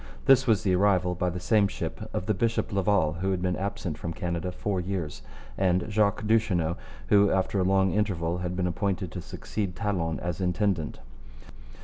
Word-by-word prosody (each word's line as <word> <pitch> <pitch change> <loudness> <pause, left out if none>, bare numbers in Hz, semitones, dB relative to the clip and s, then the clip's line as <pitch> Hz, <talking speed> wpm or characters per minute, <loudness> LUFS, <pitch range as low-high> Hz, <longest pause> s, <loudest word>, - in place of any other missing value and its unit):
This 135 -1 +5
was 110 -4 +3
the 95 - +2
arrival, 90 -1 +3
by 90 0 -1
the 90 +1 -4
same 100 +3 +3
ship, - - -5
of 90 - -3
the 110 - +1
bishop 115 +2 -1
Laval, 95 -5 +2
who 95 - 0
had 95 -2 0
been 90 0 0
absent 95 -4 -4
from 85 - -4
Canada 85 +1 -3
four 95 +1 -2
years, 90 -4 -4 0.4
and 90 -2 +2
Jacques 105 0 +1
Duchesneau, 100 -7 +2 0.3
who 100 0 +5
after 95 +1 +1
a - - +3
long 95 0 +3
interval 90 -5 0
had 90 0 -3
been 90 0 0
appointed 90 0 -1
to 90 - -5
succeed 95 +1 -4
Talon 90 -7 -1
as 90 +1 -3
intendant. 90 -3 0
95 Hz, 180 wpm, -27 LUFS, 90-100 Hz, 0.4 s, This